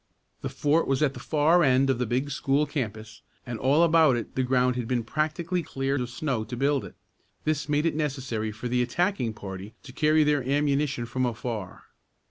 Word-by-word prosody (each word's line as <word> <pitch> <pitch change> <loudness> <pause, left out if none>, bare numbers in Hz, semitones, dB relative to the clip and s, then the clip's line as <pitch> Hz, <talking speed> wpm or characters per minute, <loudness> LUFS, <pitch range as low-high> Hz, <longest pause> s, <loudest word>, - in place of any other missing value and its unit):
The - - -3
fort 150 +3 +1
was 135 +2 +1
at 140 -3 +2
the - - -9
far 160 +3 +3
end 135 -2 +4
of 125 - -2
the 125 - 0
big 130 +5 -1
school 140 +2 +1
campus, 110 -7 -5 0.2
and 120 -3 -5
all 140 +6 +4
about 160 -5 +5
it 115 - -6
the 130 - 0
ground 125 -1 +2
had 125 -2 -3
been 120 -1 0
practically 160 +7 -1
cleared 135 -2 -2
of 125 - -3
snow 125 -2 -2
to 125 +2 -7
build 140 +1 +1
it. - - -10 0.5
This 150 -1 -1
made 150 +1 +1
it 165 - +2
necessary 130 -8 -2
for 110 +3 -6
the 125 +1 +1
attacking 125 - 0
party 95 +1 -8
to 135 - -10
carry 155 +2 +3
their 150 -1 +2
ammunition 140 -1 0
from 130 +2 -1
afar. 115 -4 -5
135 Hz, 200 wpm, -26 LUFS, 120-150 Hz, 0.5 s, about